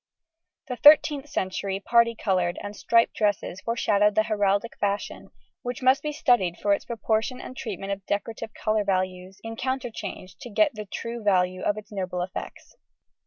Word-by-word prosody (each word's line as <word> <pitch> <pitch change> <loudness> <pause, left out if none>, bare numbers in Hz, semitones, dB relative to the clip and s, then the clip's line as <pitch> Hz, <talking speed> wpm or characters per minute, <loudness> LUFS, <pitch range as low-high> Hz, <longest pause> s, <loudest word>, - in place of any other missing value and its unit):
The 250 -2 -4
13th 295 +1 +6
century 190 -1 -2
parti 235 +2 +3
coloured 180 -5 0
and 205 0 -6
striped 230 +2 +3
dresses 205 -3 -1
foreshadowed 210 -3 +2
the 215 - +4
heraldic 205 0 0
fashion, 200 0 -2 0.3
which 245 +1 -5
must 260 +1 +5
be 300 - -2
studied 240 - +2
for 205 - +2
its - - -2
proportion 225 +2 -1
and 255 - -9
treatment 200 -5 -5
of 200 0 -4
decorative 220 +2 -3
colour 215 -1 0
values 185 -1 -2
in 225 0 -6
counterchange 240 -8 -4
to 245 - -8
get 295 +6 +3
the 215 -1 -7
true 230 +4 -5
value 185 -3 +2
of 205 - 0
its 215 +1 -10
noble 185 -3 -3
effects. 185 +1 -8
210 Hz, 165 wpm, -26 LUFS, 195-235 Hz, 0.3 s, 13th